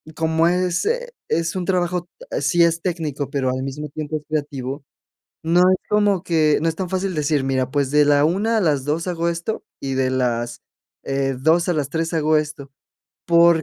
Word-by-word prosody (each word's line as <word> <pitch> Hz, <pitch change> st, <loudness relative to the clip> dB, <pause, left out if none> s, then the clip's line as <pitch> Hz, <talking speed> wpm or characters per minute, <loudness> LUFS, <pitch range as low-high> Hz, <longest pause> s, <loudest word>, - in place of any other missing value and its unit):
como 160 Hz, +1 st, +2 dB
es, 180 Hz, 0 st, +1 dB
eh, 485 Hz, +2 st, -1 dB, 0.2 s
es 165 Hz, +2 st, 0 dB
un 180 Hz, -2 st, -2 dB
trabajo, 180 Hz, -1 st, 0 dB, 0.2 s
ah, -, -, -2 dB
sí 175 Hz, -1 st, +3 dB
es 170 Hz, 0 st, +2 dB
técnico, 155 Hz, -6 st, -3 dB
pero 135 Hz, -2 st, -1 dB
al 130 Hz, +1 st, -2 dB
mismo 145 Hz, +3 st, -5 dB
tiempo 155 Hz, +1 st, -4 dB
es 150 Hz, -, -11 dB
creativo, 145 Hz, -2 st, -3 dB, 0.6 s
no 165 Hz, +2 st, +3 dB
es 185 Hz, +1 st, +5 dB
como 205 Hz, -3 st, +2 dB
que 155 Hz, -3 st, +2 dB
no 165 Hz, -, +2 dB
es 160 Hz, -, -2 dB
tan 185 Hz, -1 st, -3 dB
fácil 190 Hz, 0 st, -2 dB
decir: 150 Hz, -2 st, +1 dB
"Mira, 130 Hz, -1 st, 0 dB
pues, 140 Hz, -1 st, 0 dB
de 150 Hz, 0 st, +5 dB
la 145 Hz, 0 st, +4 dB
1:00 205 Hz, +8 st, +1 dB
a -, -, +3 dB
las 145 Hz, -5 st, +1 dB
2:00 160 Hz, +4 st, -1 dB
hago 170 Hz, -1 st, -1 dB
esto 170 Hz, +6 st, -3 dB, 0.2 s
y 135 Hz, -, -3 dB
de 130 Hz, -1 st, +1 dB
las, 120 Hz, -2 st, -1 dB, 0.4 s
eh, 135 Hz, -1 st, -1 dB
2:00 160 Hz, +6 st, +2 dB
a 175 Hz, -, +2 dB
las 145 Hz, -2 st, -2 dB
3:00 165 Hz, +1 st, -2 dB
hago 155 Hz, -1 st, +3 dB
esto, 150 Hz, -2 st, -5 dB, 0.6 s
porque 170 Hz, -1 st, +5 dB
160 Hz, 205 wpm, -21 LUFS, 140-175 Hz, 0.6 s, es